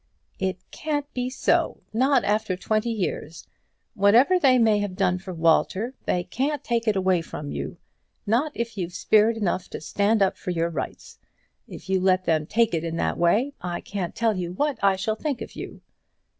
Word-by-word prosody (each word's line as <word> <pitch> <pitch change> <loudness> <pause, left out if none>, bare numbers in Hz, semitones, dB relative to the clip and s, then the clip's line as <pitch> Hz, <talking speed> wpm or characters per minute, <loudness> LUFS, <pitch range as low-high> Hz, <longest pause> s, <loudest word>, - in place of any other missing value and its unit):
"It 190 -1 -1
can't 295 -2 -2
be 250 0 -2
so, 265 +1 0
not 260 +3 +3
after 210 -3 0
twenty 215 +4 0
years. 175 -7 -3 0.5
Whatever 235 - +5
they 265 -5 +5
may 220 -3 +4
have 205 -3 -3
done 185 -2 +1
from 185 -2 -8
Walter, 185 +8 +2
they 180 - +1
can't 280 +8 -2
take 235 -1 -1
it 215 - +3
away 185 -2 +2
from 150 -3 -7
you; - - -5 0.5
not 240 +9 +1
if 230 -3 -4
you've 175 -1 -4
spirit 220 +4 +3
enough 185 -3 -1
to - - -6
stand 205 +7 +1
up 190 - 0
for - - -6
your 170 -1 0
rights. - - -6 0.5
If - - -11
you 190 0 +2
let 185 0 +2
them 155 -2 +1
take 230 +1 +2
it 165 -1 0
in 165 -1 -3
that - - -1
way, 215 +12 +2
I 175 -1 -3
can't 190 -4 -5
tell 225 -2 +1
you 180 -1 -3
what 285 +4 -1
I 195 -1 +5
shall 200 +3 -1
think 280 +1 -3
of 225 - -8
you." - - -8
205 Hz, 190 wpm, -25 LUFS, 180-235 Hz, 0.5 s, Whatever